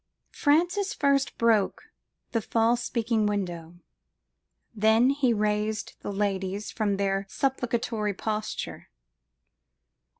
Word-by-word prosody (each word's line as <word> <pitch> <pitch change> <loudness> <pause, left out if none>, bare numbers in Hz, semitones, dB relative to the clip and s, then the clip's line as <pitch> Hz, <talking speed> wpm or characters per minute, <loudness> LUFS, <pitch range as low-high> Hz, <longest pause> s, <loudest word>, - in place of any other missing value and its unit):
"Francis 350 +7 +2
first 280 -1 +1
broke 225 -4 +2 0.5
the 230 - 0
false 230 +3 +1
speaking 230 -2 0
window, 175 -5 -3 1.0
then 220 +4 +4
he 280 -3 +2
raised 210 0 -1
the - - -5
ladies 195 0 -2
from 205 -3 0
their 195 0 0
supplicatory 235 -5 -1
posture. 215 +1 -4
220 Hz, 95 wpm, -27 LUFS, 205-245 Hz, 1.0 s, then